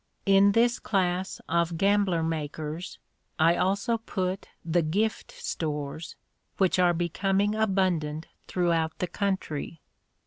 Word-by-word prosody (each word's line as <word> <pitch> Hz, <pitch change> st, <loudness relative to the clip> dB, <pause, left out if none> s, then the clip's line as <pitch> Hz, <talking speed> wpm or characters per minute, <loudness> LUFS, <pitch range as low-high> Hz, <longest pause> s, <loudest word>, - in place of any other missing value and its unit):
In 195 Hz, 0 st, +5 dB
this 235 Hz, +2 st, +3 dB
class 185 Hz, -2 st, -1 dB
of 170 Hz, 0 st, +1 dB
gambler 195 Hz, -3 st, +2 dB
makers 155 Hz, +1 st, -4 dB, 0.4 s
I 165 Hz, +1 st, +4 dB
also 200 Hz, +6 st, +1 dB
put 190 Hz, -4 st, -3 dB, 0.2 s
the 170 Hz, +1 st, +2 dB
"gift 200 Hz, +8 st, -1 dB
stores," 150 Hz, 0 st, -4 dB, 0.4 s
which 185 Hz, -1 st, +2 dB
are 175 Hz, -1 st, +4 dB
becoming 195 Hz, +4 st, +1 dB
abundant 185 Hz, -8 st, 0 dB, 0.2 s
throughout 165 Hz, -3 st, 0 dB
the -, -, -1 dB
country. 175 Hz, -5 st, -3 dB
180 Hz, 110 wpm, -27 LUFS, 160-195 Hz, 0.4 s, In